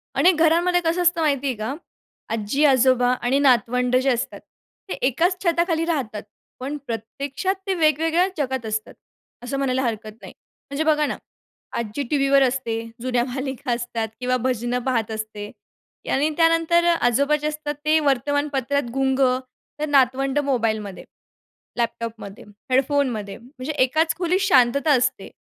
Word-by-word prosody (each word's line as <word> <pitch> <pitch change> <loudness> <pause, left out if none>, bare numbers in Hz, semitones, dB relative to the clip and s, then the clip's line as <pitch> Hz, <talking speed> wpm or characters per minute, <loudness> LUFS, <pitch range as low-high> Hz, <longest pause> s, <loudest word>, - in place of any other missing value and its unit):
अनेक 345 +7 +4
घरांमध्ये 345 +2 +3
कसं 335 +2 +1
असतं 345 -1 +2
माहिती 280 -3 +1
आहे 255 - -1
का, 215 +5 -4 0.6
आज्जी-आजोबा 250 +2 +3
आणि 260 +3 +1
नातवंड 250 -1 +2
जे 275 - +2
असतात, 245 -1 -2 0.5
ते - - -2
एकाच 340 +8 +1
छताखाली 340 -1 +1
राहतात. 255 -11 -2 0.4
पण 280 +3 -4
प्रत्यक्षात 275 - -3
ते 385 - +1
वेगवेगळ्या 325 +2 +2
जगात 265 -4 -2
असतात, 215 0 -3 0.5
असं 260 +3 -3
म्हणायला 265 -1 0
हरकत 220 -2 -3
नाही. - - -11 0.4
म्हणजे 280 +3 -1
बघा 300 -1 +2
ना - - -3 0.6
आज्जी 235 +5 -3
टीव्हीवर 275 -1 +3
असते 250 -3 -1 0.2
जुन्या 245 -1 0
मालिका 265 0 -4
असतात 235 -1 -2
किंवा 255 0 0
भजनं 245 -1 0
पाहत 230 -4 0
असते 215 -1 -6 0.6
आणि 285 +3 +2
त्यानंतर 330 +1 +3
आजोबा 280 -3 +3
जे 300 - -1
असतात 300 -1 -4
ते 315 +1 +4
वर्तमानपत्रात 285 0 0
गुंग 270 0 0 0.6
तर 305 - 0
नातवंड 270 +1 +2
मोबाईलमध्ये, 225 -8 -1 0.7
लॅपटॉपमध्ये, 230 -2 -4 0.3
हेडफोनमध्ये. 255 -6 0
म्हणजे 255 +4 -7
एकाच 310 +4 +1
खोलीत 365 +2 +1
शांतता 280 -5 +3
असते. 250 +1 -1
270 Hz, 135 wpm, -22 LUFS, 240-305 Hz, 0.7 s, अनेक